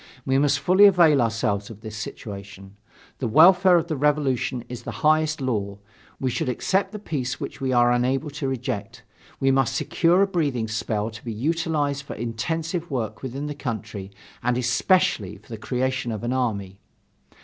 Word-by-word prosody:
We 135 0 +2
must 145 0 +3
fully 185 +8 +5
avail 170 -8 +6
ourselves 105 -3 -1
of 110 -2 -11
this 110 -1 -8
situation. 100 -2 -8 0.4
The 130 - -1
welfare 180 - +6
of 165 - 0
the 160 - -2
Revolution 135 -4 0
is 125 -1 -7
the - - -6
highest 155 0 +3
law. 100 -6 -2 0.4
We 130 -1 -1
should 125 - -1
accept 190 - 0
the 215 - -6
peace 145 -10 -3
which - - -7
we 130 -1 0
are 120 -1 +4
unable 130 +4 0
to 145 -1 -4
reject; 125 -6 -4 0.4
we 135 0 +3
must 135 -1 +1
secure 175 +7 +3
a - - +2
breathing 145 - -1
spell 110 0 -2
to 110 - -11
be 115 - -4
utilized 145 +3 -1
for 140 - -8
intensive 160 - -3
work 120 -7 -3
within 135 +2 -5
the 150 - -3
country 110 -7 -5 0.3
and, 125 0 0
especially, 125 - +1
for - - -23
the 115 - -6
creation 125 +1 -2
of 110 0 -5
an 120 +2 -1
army. 100 -7 -2
130 Hz, 175 wpm, -24 LUFS, 115-150 Hz, 0.4 s, avail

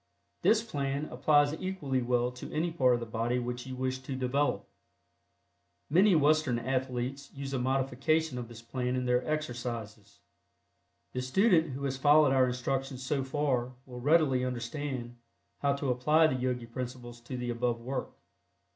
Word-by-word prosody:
This 220 0 +4
plan 140 -7 -2
applies 145 +3 +3
equally 150 -9 -1
well 125 0 +1
to 125 - -9
any 165 +2 0
part 130 -7 +3
of - - -2
the 115 - -5
body 115 +2 -1
which 125 +1 -4
you 130 - -5
wish 130 0 -2
to 130 +1 -6
develop. 130 +3 0 1.2
Many 190 +4 +5
Western 155 -4 +3
athletes 130 +2 -2
use 140 0 -5
a 130 - 0
modification 135 +3 0
of 120 - -6
this 115 0 -12
plan 125 +1 -2
in 125 0 -1
their 125 0 +2
exercises. 120 -8 -4 1.0
The 125 - -2
student 165 - +3
who 140 +2 -5
has 135 -1 -1
followed 145 0 +5
our 130 -1 +4
instructions 130 +1 -2
so 135 +1 0
far 130 -3 -1
will 125 -2 -9
readily 145 -3 +3
understand 125 0 -4 0.4
haw 140 -1 +3
to 140 -2 -1
apply 150 +6 +4
the 155 - +2
Yogi 125 -1 -1
principles 120 0 -7
in 125 - -3
the 120 0 -2
above 120 0 -1
work. 130 +3 -4
130 Hz, 160 wpm, -30 LUFS, 125-145 Hz, 1.2 s, Many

